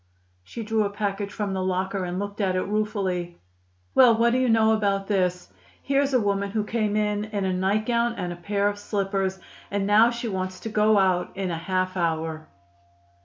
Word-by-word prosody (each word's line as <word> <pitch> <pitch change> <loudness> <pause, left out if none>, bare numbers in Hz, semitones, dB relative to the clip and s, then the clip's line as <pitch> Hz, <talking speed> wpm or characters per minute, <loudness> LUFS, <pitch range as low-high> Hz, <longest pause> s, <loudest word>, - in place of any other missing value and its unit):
She 225 - -7
drew 220 0 +1
a 200 - -1
package 200 -1 -3
from 205 -2 -3
the 190 - -2
locker 185 +1 -1
and 175 0 -4
looked 205 +2 -4
at 190 -2 +1
it 185 - +1
ruefully. 195 -5 -2 0.6
"Well, 240 -3 +6
what 235 +1 +3
do 255 - +2
you 255 -1 +2
know 220 -1 +4
about 200 -2 0
this? 180 -3 -1 0.3
Here's 275 0 +1
a 255 - +3
woman 200 -2 0
who 215 +1 -1
came 210 -1 -1
in 210 0 0
in 205 -2 -3
a 190 - 0
nightgown 215 +6 +1
and 175 -5 -5
pair 200 +2 0
of 205 0 -2
slippers. 195 -2 -1 0.3
And 200 -1 -1
now 215 +3 +5
she 235 0 -4
wants 185 -2 -3
to 225 - -5
go 215 0 +3
out 185 -1 +1
in 190 -2 -2
half 185 +2 -2
an 180 - -1
hour!" 160 -1 -2
200 Hz, 195 wpm, -25 LUFS, 185-215 Hz, 0.6 s, Well